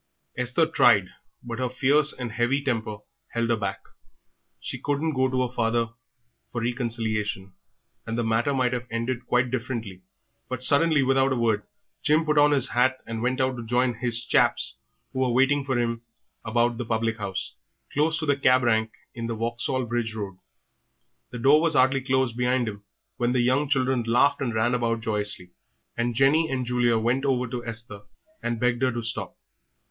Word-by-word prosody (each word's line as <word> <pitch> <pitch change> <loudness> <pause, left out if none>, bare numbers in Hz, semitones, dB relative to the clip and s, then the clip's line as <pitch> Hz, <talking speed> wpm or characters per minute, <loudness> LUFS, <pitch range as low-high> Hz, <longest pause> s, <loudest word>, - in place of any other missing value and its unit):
Esther 125 +6 +1
tried, 115 - +4 0.3
but 120 0 -6
her 130 -1 -1
fierce 145 +4 +5
and 125 -3 -5
heavy 120 +5 0
temper 110 -5 -2 0.4
held 115 0 0
her - - +3
back. 100 -3 -4 0.8
She - - -6
couldn't 145 +2 -1
go 130 -1 +1
to 130 0 0
her 125 - -16
father 115 -1 0 0.6
for 120 - -3
reconciliation, 110 -5 -2 0.5
and 115 +1 -3
the 120 - 0
matter 115 +4 +1
might 130 -2 +1
have 120 0 -4
ended 115 +2 -3
quite 125 0 +1
differently, 115 -7 -4 0.5
but 130 -1 -3
suddenly, 145 +1 +5
without 135 0 +3
another 130 -3 -1
word, 110 -3 +1 0.4
Jim 155 +2 +2
put 150 -1 +2
on 145 0 +6
his 135 -3 +4
hat 130 +2 +2
and 115 -1 -5
went 125 +2 -1
out 130 -1 0
to 120 - -6
join 125 +2 +1
"his 120 0 -3
chaps" - - +3 0.3
who 130 - -3
were 130 -1 +2
waiting 135 +4 +2
for 135 -2 -1
him 115 -1 -1 0.4
about 120 +1 0
the 120 - -3
public 115 0 -1
house, 100 -3 -4 0.4
close 155 +2 +1
to 160 - -3
the 145 -1 +2
cab 130 -2 +3
rank 110 -2 +2 0.2
in 115 -1 -5
the 115 - -3
Vauxhall 120 +3 -2
Bridge 120 -1 -3
Road. 100 -4 -6 0.9
The 125 - -7
door 140 +6 +5
was 165 -2 +2
hardly 130 +1 +3
closed 130 -2 0
behind 125 0 0
him 100 -1 -6 0.3
when 120 0 0
the 125 - +2
young 130 +4 +1
children 130 -3 +1
laughed 125 +6 +3
and 125 -4 -1
ran 115 +2 +1
about 115 -2 0
joyously, 105 -5 -2 0.4
and 120 0 -1
Jenny 145 +6 +3
and 130 -2 -2
Julia 120 -1 +2
went 120 +4 0
over 130 -3 +1
to 120 0 -5
Esther 115 -3 -6 0.4
and 120 -1 -2
begged 125 0 0
her 130 -1 +2
to 120 0 -4
stop. 115 - -4
120 Hz, 185 wpm, -25 LUFS, 115-130 Hz, 0.9 s, on